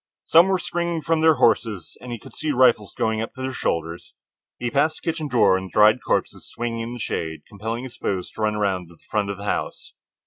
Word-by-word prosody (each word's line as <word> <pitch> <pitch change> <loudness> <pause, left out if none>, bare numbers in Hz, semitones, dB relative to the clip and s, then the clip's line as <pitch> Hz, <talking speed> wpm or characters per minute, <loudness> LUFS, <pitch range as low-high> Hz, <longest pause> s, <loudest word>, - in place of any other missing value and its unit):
Some 165 +3 +6
were 190 -1 +2
springing 170 -2 -2
from 160 +2 +1
their 160 -1 +6
horses, 105 - +1
and 125 - -8
he 120 - -3
could - - -14
see 155 - -3
the 145 - +1
rifles 120 -5 +4
going 110 0 0
to 115 - -2
their 130 0 -3
shoulders. 85 -6 -3 0.4
He 120 -1 -3
passed 155 +3 +1
the - - -20
kitchen 160 -2 -1
door 125 -7 +4
and 95 0 -3
the - - -17
dried 110 +5 +5
corpses - - -1
swinging 115 -1 -3
in 115 +1 -4
the 125 - -7
shade, 80 -6 -3
compelling 110 +4 -5
his 130 -2 -9
foes 95 -2 -3
to - - -8
run 105 0 +1
around 95 -4 -1
the 85 - -17
front 105 -2 0
of 100 - -4
the 100 - -9
house. - - -3
115 Hz, 235 wpm, -23 LUFS, 100-140 Hz, 0.4 s, Some